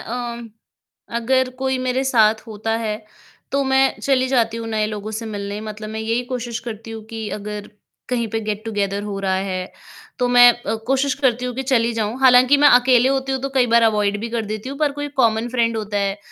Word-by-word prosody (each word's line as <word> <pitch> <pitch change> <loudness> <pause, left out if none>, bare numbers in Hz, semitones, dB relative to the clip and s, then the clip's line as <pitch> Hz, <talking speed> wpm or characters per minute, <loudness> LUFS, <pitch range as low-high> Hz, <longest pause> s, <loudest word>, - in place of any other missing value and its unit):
अ, 230 - -6 0.2
म 235 -1 -10 0.7
अगर 260 +2 +1
कोई 265 0 0
मेरे 255 +1 0
साथ 225 -5 +4
होता 220 0 -5
है, 215 -2 -2 0.6
तो 280 0 +2
मैं 265 0 +2
चली 260 -2 +1
जाती 230 -4 +1
हूँ 230 0 -5
नए 215 -1 0
लोगों 210 0 -5
से 220 +1 -5
मिलने 205 -1 -5
मतलब 215 0 -7
मैं 220 0 -4
यही 230 +2 -1
कोशिश 245 -2 -4
करती 225 +1 -9
हूँ 220 -1 -8
कि 225 -2 -5
अगर 210 0 -7 0.4
कहीं 235 -2 -1
पे 225 - -2
गेट 215 0 -4
टुगेदर 205 -2 -2
हो 205 -1 -4
रहा 190 -1 0
है, 185 -1 -3 0.5
तो 250 - +1
मैं 245 0 +8
अ, 235 -2 -4
कोशिश 270 +1 +1
करती 250 -3 0
हूँ 250 - -3
कि 265 - -3
चली 235 -3 +1
जाऊँ। 220 +2 -2
हालाँकि 255 +1 +6
मैं 290 +1 +6
अकेले 250 0 +5
होती 270 0 -1
हूँ 265 - -1
तो 275 - -1
कई 255 -2 +4
बार 235 0 +4
अवॉइड 210 -2 +2
भी 230 - -4
कर 230 -1 -2
देती 215 +3 -5
हूँ 275 +1 -7
पर 300 -2 +1
कोई 290 0 -5
कॉमन 225 -1 +2
फ्रेंड 230 -2 0
होता 210 -1 -2
है, 200 0 -1
230 Hz, 220 wpm, -20 LUFS, 215-255 Hz, 0.7 s, मैं